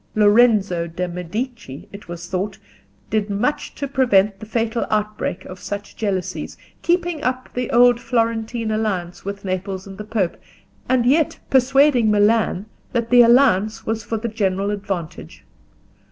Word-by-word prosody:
Lorenzo 205 -5 +4
de' 180 +2 -3
Medici, 180 - -6
it 200 +1 -11
was 175 0 -7
thought, 190 +2 -3 0.5
did 215 -1 0
much 225 +9 -1
to 280 - -3
prevent 210 -7 +2
the 220 - -9
fatal 230 +1 -1
outbreak 215 -3 -2
of 185 0 -9
such 205 +1 -6
jealousies, 195 -4 -3 0.2
keeping 350 -2 0
up 255 -1 -2
the 250 -1 -2
old 245 0 +5
Florentine 230 -1 -1
alliance 195 -5 -2
with 200 0 -6
Naples 190 0 -3
and 195 0 -11
the - - -4
Pope, 210 -5 -1 0.5
and 250 -2 +3
yet 295 +5 +2
persuading 265 -2 +4
Milan 210 -2 +2 0.3
that 235 -1 -1
the 245 0 +8
alliance 235 -4 +4
was 220 0 -2
for 225 - -3
the 225 +2 -3
general 200 -2 -1
advantage. 195 -5 -5
215 Hz, 145 wpm, -21 LUFS, 195-240 Hz, 0.5 s, the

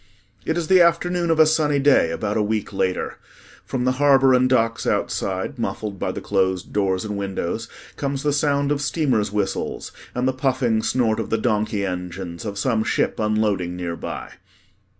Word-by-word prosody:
It 160 - 0
is 170 0 -2
afternoon 175 -1 +4
of 165 -1 +2
a 155 - +8
sunny 150 -2 +2
day 140 - +4
about 100 +5 -2
a 110 - +2
week 105 -1 -2
later. 95 -1 -1 0.4
From 125 -2 -3
the 130 - +3
harbor 135 -2 +5
and 130 0 +4
docks 115 -2 +1
outside, 95 +8 -1
muffled 100 -2 -4
by - - -1
the - - -6
closed 95 -3 -1
door 100 -2 +1
and 105 +3 -4
windows, 100 +2 -3 0.3
comes 140 -1 -2
the 145 -1 +1
sound 140 -1 +1
of 145 -1 0
steamers' 130 -9 0
whistles 100 -2 -2 0.2
and 125 +1 0
the 130 - +1
puffing 130 -4 +1
snort 115 -2 +1
of - - -3
the 115 - +1
donkey 105 -2 0
engines 90 0 -5
of 100 -1 -4
some 110 +1 +1
ship - - 0
unloading 105 -5 0
nearby. 85 0 -5
110 Hz, 170 wpm, -22 LUFS, 100-140 Hz, 0.4 s, a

